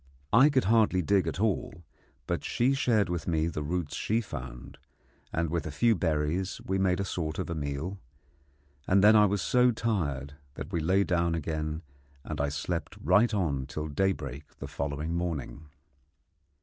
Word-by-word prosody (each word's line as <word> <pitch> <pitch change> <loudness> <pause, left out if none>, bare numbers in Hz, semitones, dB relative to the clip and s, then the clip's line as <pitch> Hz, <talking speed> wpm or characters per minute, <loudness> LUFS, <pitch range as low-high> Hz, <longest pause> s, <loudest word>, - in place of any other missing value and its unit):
I 130 +6 +7
could 135 -3 +2
hardly 105 -4 +3
dig 100 +3 +2
at - - -3
all, 100 -5 -1 0.4
but - - -2
she 125 +3 +1
shared 115 -6 +2
with 85 -2 -3
me 80 -2 +1
the 80 -2 -3
roots 80 0 -2
she 110 +2 0
found, 65 - -8 0.5
and 85 -1 -1
with 85 -2 -1
a - - -4
few 115 +10 +3
berries 80 +1 -1
we 95 0 0
made 95 -1 +2
a 100 - -1
sort 80 -4 -3
of 90 -2 -3
a - - 0
meal; 80 +5 -4 0.9
and 95 +1 +4
then 105 +1 +8
I 105 -1 +7
was 100 -1 -1
so 125 0 +4
tired 80 - -1 0.2
that - - -7
we 85 - 0
lay 95 +5 +3
down 85 -3 +1
again, 80 0 -3 0.4
and - - -4
I 70 - +1
slept 80 +4 -4
right 105 +9 +4
on 75 - -1
till 75 +3 -4
daybreak 75 -4 -2
the - - -6
following 75 +3 -3
morning. 80 -3 -4
85 Hz, 175 wpm, -29 LUFS, 75-100 Hz, 0.9 s, then